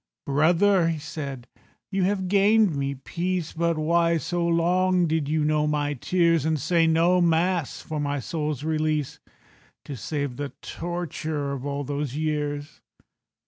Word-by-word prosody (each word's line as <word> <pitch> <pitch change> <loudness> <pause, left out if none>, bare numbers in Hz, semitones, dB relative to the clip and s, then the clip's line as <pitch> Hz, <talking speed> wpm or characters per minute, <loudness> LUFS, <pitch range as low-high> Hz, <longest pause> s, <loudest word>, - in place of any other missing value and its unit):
"Brother," 170 +6 +3
he 165 -1 0
said, 145 -4 -6 0.5
"you 195 0 0
have 190 -1 0
gained 205 -1 +4
me 140 0 -2
peace, 175 +4 -3
But 170 0 0
why 170 +2 +2
so 170 +2 -2
long 180 +2 +2
did 155 -3 -1
you 155 -1 +1
know 150 0 +2
my 145 -1 0
tears, 165 +2 +2
And 160 0 0
say 165 +2 +2
no 170 +3 +3
Mass 170 -1 +1
for 155 -1 -4
my 145 -1 -1
soul's 150 0 -3
release, 155 -2 -1 0.7
To 140 - -6
save 140 +1 -3
the 145 -1 -5
torture 160 -4 -4
of 140 0 -4
all 140 0 -2
those 145 -1 -3
years?" 150 -1 -3
155 Hz, 145 wpm, -25 LUFS, 145-170 Hz, 0.7 s, gained